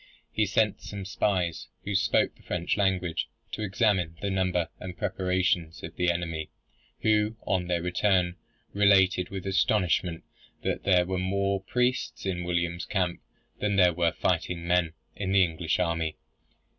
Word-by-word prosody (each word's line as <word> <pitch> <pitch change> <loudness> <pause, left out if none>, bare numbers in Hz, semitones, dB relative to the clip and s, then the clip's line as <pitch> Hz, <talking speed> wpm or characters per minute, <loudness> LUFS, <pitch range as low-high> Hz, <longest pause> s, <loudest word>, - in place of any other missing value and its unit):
He 110 -2 +1
sent 105 0 +1
some 100 -2 -6
spies, 95 -3 -1 0.2
who 100 - -3
spoke 100 +2 +2
the - - -23
French 85 -1 -1
language, 95 -4 0 0.2
to - - -4
examine 95 -5 +1
the 100 +2 -2
number 90 -3 0
and 90 0 -7
preparations 90 -3 0
of 80 - -7
the 90 0 +1
enemy, 80 -2 -2 0.5
who, 110 0 +2
on 90 -2 0
their 85 -1 0
return, 90 0 +2 0.4
related 95 -3 +4
with 95 -2 -6
astonishment 95 -4 +1 0.4
that - - -2
there 90 -2 +4
were 95 0 -2
more 100 +1 0
priests 125 +4 -1
in 90 -2 -1
William's 85 0 -1
camp 90 -4 -1 0.4
than 105 -1 0
there 90 -2 +5
were 85 0 +2
fighting 85 -1 -1
men 85 -2 +2 0.2
in 95 -1 -2
the 95 -1 +6
English 80 -1 -1
army. 85 -3 -1
90 Hz, 150 wpm, -28 LUFS, 85-100 Hz, 0.5 s, the